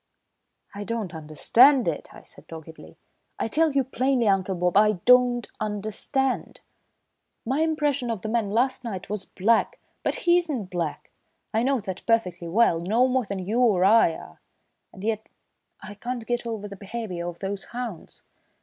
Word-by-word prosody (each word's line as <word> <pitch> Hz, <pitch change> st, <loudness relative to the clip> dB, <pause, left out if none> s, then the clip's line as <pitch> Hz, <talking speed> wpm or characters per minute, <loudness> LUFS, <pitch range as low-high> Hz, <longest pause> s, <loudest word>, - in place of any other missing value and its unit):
"I 205 Hz, +1 st, -6 dB
don't 220 Hz, -5 st, -4 dB
understand 225 Hz, -, +4 dB
it," -, -, -3 dB
I -, -, -14 dB
said -, -, -15 dB
doggedly. 160 Hz, 0 st, -11 dB, 0.4 s
"I -, -, -1 dB
tell 315 Hz, +7 st, +2 dB
you 275 Hz, -1 st, +2 dB
plainly, 255 Hz, -1 st, 0 dB
Uncle 195 Hz, -1 st, +1 dB
Bob, 180 Hz, 0 st, 0 dB
I 210 Hz, +1 st, +5 dB
don't 250 Hz, -1 st, +5 dB
understand. 215 Hz, +6 st, -2 dB, 0.8 s
My 265 Hz, +5 st, 0 dB
impression 295 Hz, -5 st, 0 dB
of 225 Hz, -5 st, -3 dB
the -, -, -3 dB
man 220 Hz, -2 st, 0 dB
last 255 Hz, +4 st, 0 dB
night 195 Hz, -5 st, -6 dB
was 210 Hz, -2 st, -3 dB
'black,' 220 Hz, +4 st, +1 dB, 0.2 s
but -, -, -1 dB
he's 345 Hz, -1 st, +3 dB
not 225 Hz, -10 st, -4 dB
black, 170 Hz, -4 st, -4 dB, 0.4 s
I 220 Hz, -, +2 dB
know 265 Hz, +1 st, +1 dB
that 190 Hz, -3 st, -6 dB
perfectly 180 Hz, -7 st, 0 dB
well, 175 Hz, -2 st, +3 dB
no 220 Hz, +9 st, +2 dB
more 255 Hz, -2 st, 0 dB
than 190 Hz, -2 st, -5 dB
you 220 Hz, +5 st, 0 dB
or 205 Hz, -7 st, +4 dB
I 205 Hz, -5 st, +5 dB
are, 80 Hz, 0 st, -13 dB, 0.5 s
and 190 Hz, -, -12 dB
yet 220 Hz, 0 st, -2 dB, 0.5 s
I 200 Hz, +2 st, -8 dB
can't 240 Hz, +3 st, -5 dB
get 240 Hz, 0 st, -2 dB
over 220 Hz, -3 st, -4 dB
the 200 Hz, -, -9 dB
behaviour 200 Hz, -4 st, -5 dB
of 175 Hz, -1 st, -6 dB
those 195 Hz, +1 st, -5 dB
hounds. 240 Hz, -8 st, -7 dB
220 Hz, 170 wpm, -25 LUFS, 190-250 Hz, 0.8 s, I